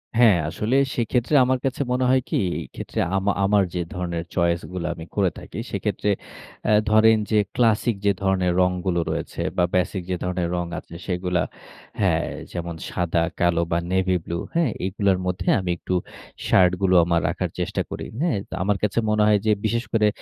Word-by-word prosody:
হ্যাঁ, 115 Hz, -6 st, +6 dB
আসলে 110 Hz, +9 st, -1 dB, 0.2 s
সেক্ষেত্রে 120 Hz, +4 st, 0 dB
আমার 130 Hz, 0 st, +1 dB
কাছে 135 Hz, +1 st, -1 dB
মনে 125 Hz, +1 st, +1 dB
হয় 130 Hz, 0 st, +4 dB
কি? -, -, -1 dB, 0.2 s
এই -, -, -6 dB
ক্ষেত্রে -, -, -5 dB, 0.2 s
আমা 100 Hz, +1 st, +2 dB
আমার 100 Hz, 0 st, +4 dB
যে 90 Hz, -, -1 dB
ধরনের 85 Hz, -2 st, -3 dB
চয়েস 85 Hz, -1 st, +2 dB
গুলো 90 Hz, -2 st, -3 dB
আমি 80 Hz, -, -9 dB
করে 100 Hz, -3 st, +3 dB
থাকি, -, -, -10 dB
সেক্ষেত্রে 105 Hz, -, -1 dB, 0.6 s
অ্যা 110 Hz, -, +3 dB, 0.2 s
ধরেন 110 Hz, +1 st, +6 dB
যে, 110 Hz, -, +4 dB, 0.2 s
ক্লাসিক 115 Hz, -1 st, +2 dB
যে 100 Hz, -, +5 dB
ধরনের 95 Hz, -2 st, +2 dB
রংগুলো 90 Hz, -1 st, +1 dB
রয়েছে -, -, -4 dB, 0.2 s
বা 90 Hz, -, +4 dB
বেসিক 90 Hz, +1 st, 0 dB
যে 90 Hz, -, 0 dB
ধরনের 90 Hz, -1 st, -1 dB
রং 85 Hz, 0 st, -1 dB
আছে 85 Hz, -, -13 dB
সেগুলো 90 Hz, -1 st, 0 dB, 0.6 s
হ্যাঁ। -, -, +2 dB, 0.3 s
যেমন 85 Hz, -1 st, -4 dB
সাদা, 85 Hz, -1 st, 0 dB, 0.2 s
কালো 85 Hz, -1 st, +3 dB
বা 85 Hz, -, +2 dB
নেভি 95 Hz, 0 st, +2 dB
ব্লু। 85 Hz, -, -3 dB, 0.2 s
হ্যাঁ? 165 Hz, -9 st, +2 dB
এগুলোর 95 Hz, 0 st, +1 dB
মধ্যে 90 Hz, 0 st, -3 dB
আমি 90 Hz, -, -4 dB
একটু 90 Hz, -, -4 dB, 0.5 s
শার্ট 90 Hz, -1 st, +5 dB
গুলো 95 Hz, -1 st, +3 dB, 0.3 s
রাখার -, -, -2 dB
চেষ্টা -, -, -1 dB
করি। -, -, -5 dB, 0.2 s
হ্যাঁ? 165 Hz, -11 st, +1 dB
তো -, -, -9 dB
আমার 100 Hz, +1 st, +1 dB
কাছে 105 Hz, +2 st, +1 dB
মনে 105 Hz, 0 st, +3 dB
হয় 105 Hz, -1 st, +4 dB
যে 110 Hz, -, +4 dB
বিশেষ 115 Hz, +2 st, 0 dB
করে, 110 Hz, -1 st, +4 dB
95 Hz, 180 wpm, -23 LUFS, 90-110 Hz, 0.6 s, হ্যাঁ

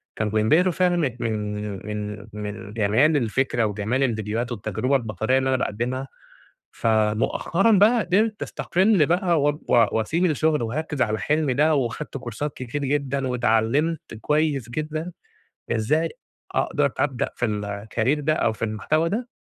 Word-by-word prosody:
كانوا 105 Hz, -1 st, -1 dB
بينبهروا 155 Hz, +13 st, +3 dB
فعلًا 180 Hz, 0 st, +2 dB
من 140 Hz, -8 st, 0 dB
من 105 Hz, -3 st, -3 dB
من 105 Hz, -1 st, -5 dB
من 105 Hz, 0 st, -6 dB
جمال 115 Hz, +9 st, +3 dB
الفكرة، 120 Hz, -1 st, 0 dB
وجمال 110 Hz, +6 st, -1 dB
الفيديوهات 115 Hz, 0 st, -1 dB
والتجربة 110 Hz, +5 st, -1 dB
البصرية 115 Hz, +1 st, 0 dB
اللي 130 Hz, 0 st, +1 dB
أنا 130 Hz, -, +2 dB
باقدِّمها، 125 Hz, +4 st, -2 dB, 0.7 s
فمؤخرًا 110 Hz, -, +1 dB
بقى 215 Hz, +4 st, +5 dB
قدرت 210 Hz, +4 st, +1 dB
أستقل 185 Hz, -4 st, +2 dB
بقى 175 Hz, -3 st, +2 dB
واب 145 Hz, +1 st, +1 dB
و 115 Hz, -2 st, +6 dB
وأسيب 160 Hz, +11 st, 0 dB
الشغل 155 Hz, -3 st, +1 dB
وأركِّز 145 Hz, +3 st, -2 dB
على 110 Hz, 0 st, 0 dB
حلمي 150 Hz, -3 st, +1 dB
ده، 155 Hz, +3 st, +3 dB
وخدت 135 Hz, +2 st, -2 dB
كورسات 125 Hz, +5 st, -5 dB
كتير 130 Hz, +3 st, -4 dB
جدًا، 140 Hz, -1 st, -1 dB
واتعلمت 125 Hz, +6 st, 0 dB
كويس 150 Hz, -6 st, 0 dB
جدًا، 155 Hz, +5 st, -4 dB, 0.6 s
إزاي 150 Hz, +9 st, +1 dB, 0.5 s
أقدر -, -, +1 dB
أبدأ 135 Hz, -4 st, 0 dB
في 120 Hz, -, 0 dB
الcareer 105 Hz, +6 st, -1 dB
ده، 155 Hz, +2 st, +2 dB
أو 110 Hz, -, +1 dB
في 115 Hz, -, -3 dB
المحتوى 155 Hz, +10 st, 0 dB
ده، 235 Hz, +4 st, -3 dB
130 Hz, 140 wpm, -24 LUFS, 110-155 Hz, 0.7 s, و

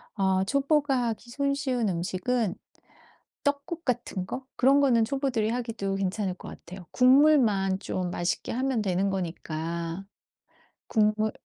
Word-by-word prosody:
어 190 Hz, -1 st, +2 dB
초보가 280 Hz, +1 st, +1 dB
하기 230 Hz, +2 st, -6 dB
손쉬운 270 Hz, -4 st, 0 dB
음식은 185 Hz, +5 st, -1 dB, 0.9 s
떡국 285 Hz, +4 st, -2 dB
같은 240 Hz, -7 st, -2 dB
거? 255 Hz, +5 st, -6 dB
그런 275 Hz, +3 st, +5 dB
거는 240 Hz, -5 st, +4 dB
초보들이 255 Hz, -4 st, 0 dB
하기도 230 Hz, -5 st, -2 dB
괜찮을 195 Hz, 0 st, -1 dB
것 -, -, -11 dB
같아요. 180 Hz, 0 st, -11 dB
국물만 250 Hz, -8 st, +4 dB
좀 185 Hz, -3 st, -3 dB
맛있게 175 Hz, 0 st, -2 dB
하면 260 Hz, 0 st, 0 dB
되는 195 Hz, 0 st, 0 dB
거니까. 170 Hz, 0 st, -4 dB, 0.8 s
국물 215 Hz, 0 st, +2 dB
220 Hz, 265 characters per minute, -27 LUFS, 190-265 Hz, 0.9 s, 그런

